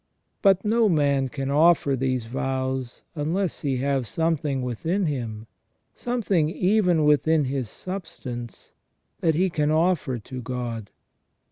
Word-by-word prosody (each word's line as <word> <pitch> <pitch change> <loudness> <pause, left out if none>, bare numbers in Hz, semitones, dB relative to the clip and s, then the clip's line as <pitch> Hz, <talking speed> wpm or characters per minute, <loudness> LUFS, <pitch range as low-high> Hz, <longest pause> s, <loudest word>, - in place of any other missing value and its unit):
But 195 0 +4
no 225 0 +3
man 140 -5 +2
can 135 +1 -3
offer 150 -2 +4
these 130 -2 -1
vows 130 0 -3
unless 170 +4 -1
he 135 -4 -1
have 135 -2 0
something 150 -2 -1
within 160 - -1
him, 115 -7 -3 0.5
something 205 -10 0
even 180 -2 +2
within 150 +1 +4
his 130 -4 -2
substance 125 - -7 0.5
that 160 -2 +2
he 185 +2 +2
can 150 -2 +1
offer 160 -5 +1
to 125 +3 -8
God. 120 -4 -4
145 Hz, 125 wpm, -25 LUFS, 130-170 Hz, 0.5 s, But